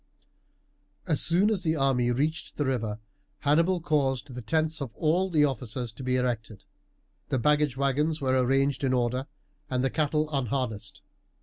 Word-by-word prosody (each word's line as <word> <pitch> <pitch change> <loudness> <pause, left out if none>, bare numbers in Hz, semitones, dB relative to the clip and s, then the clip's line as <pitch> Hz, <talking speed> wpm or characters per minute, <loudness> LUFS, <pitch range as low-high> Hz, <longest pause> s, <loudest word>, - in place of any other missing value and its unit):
As 155 -5 +2
soon 185 +6 +3
as 200 -4 0
the 160 -2 0
army 135 -4 +2
reached 150 +6 -1
the 145 - 0
river 115 -5 -1 0.4
Hannibal 165 +5 +3
caused 140 -4 0
the 125 - -6
tents 160 +6 0
of 130 -5 -5
all 175 +5 +1
the 155 -4 +4
officers 125 -3 -3
to 115 - -11
be 130 0 0
erected. 115 -5 -2 0.6
The 135 - +1
baggage 150 0 +2
wagons 145 +4 +1
were 130 -2 +1
arranged 135 +2 +1
in 130 -1 +2
order, 125 +2 0 0.4
and 125 0 0
the 135 - +1
cattle 155 0 +1
unharnessed. 110 -8 -3
135 Hz, 160 wpm, -27 LUFS, 125-155 Hz, 0.6 s, the